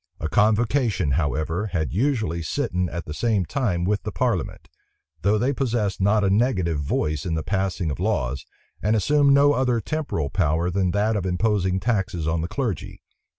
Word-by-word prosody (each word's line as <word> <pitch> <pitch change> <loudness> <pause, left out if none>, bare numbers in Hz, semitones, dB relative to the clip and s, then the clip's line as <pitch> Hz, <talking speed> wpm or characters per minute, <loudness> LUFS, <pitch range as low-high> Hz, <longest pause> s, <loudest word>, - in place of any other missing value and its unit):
A 80 - -2
convocation, 105 - +2
however, 80 - -1
had 85 -6 -2
usually 110 - 0
sitten 90 - -1
at 85 0 -5
the 75 - -6
same 105 0 0
time 95 - -1
with 100 +3 0
the 105 - -5
parliament; 120 -8 -2 0.5
though 100 +3 +2
they 125 +6 +1
possessed 115 -8 -1
not 105 +2 +3
a 95 - +2
negative 95 - +1
voice 75 +1 -1
in 85 -2 -2
the 80 - -2
passing 95 -4 -1
of 70 - -5
laws, 70 - -1 0.4
and 105 +3 +2
assumed 145 +6 +3
no 145 +1 +5
other 125 -3 +1
temporal 110 - -3
power 85 0 +1
than 95 0 +1
that 105 +4 +1
of 95 -3 -1
imposing 95 0 +1
taxes 95 -6 -1
on 80 0 0
the 85 - -2
clergy. 115 - -4
95 Hz, 175 wpm, -23 LUFS, 85-115 Hz, 0.5 s, no